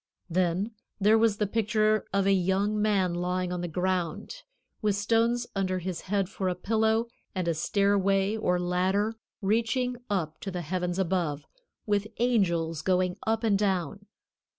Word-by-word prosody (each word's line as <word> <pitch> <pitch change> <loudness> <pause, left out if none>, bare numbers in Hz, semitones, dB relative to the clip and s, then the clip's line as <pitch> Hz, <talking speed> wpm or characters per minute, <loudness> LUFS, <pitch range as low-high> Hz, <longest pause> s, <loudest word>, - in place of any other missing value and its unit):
Then 185 +4 +1 0.3
there 215 +2 +5
was 220 -2 +3
the 210 - +1
picture 215 0 +1
of 195 0 +1
a 195 - +4
young 195 +3 +1
man 195 -4 +2
lying 180 +1 -1
on 180 - -3
the 175 - -2
ground, 185 - -2 0.4
with 210 -3 +2
stones 230 +4 +1
under 185 -1 0
his 180 -1 -4
head 195 -1 0
for 190 -1 -2
a 180 - -1
pillow, 220 +4 +1 0.3
and 185 -2 -1
a 170 - +2
stairway 195 +3 +2
or 180 -5 +1
ladder 185 +4 +1 0.3
reaching 235 +4 +1
up 165 -6 -2
to 195 - -5
the 180 -2 -4
heavens 180 +2 -2
above, 175 -6 -1 0.4
with 205 0 +1
angels 170 -10 +1
going 180 0 +1
up 225 +1 +1
and 205 -3 +3
down. 195 0 -1
195 Hz, 155 wpm, -28 LUFS, 180-215 Hz, 0.4 s, there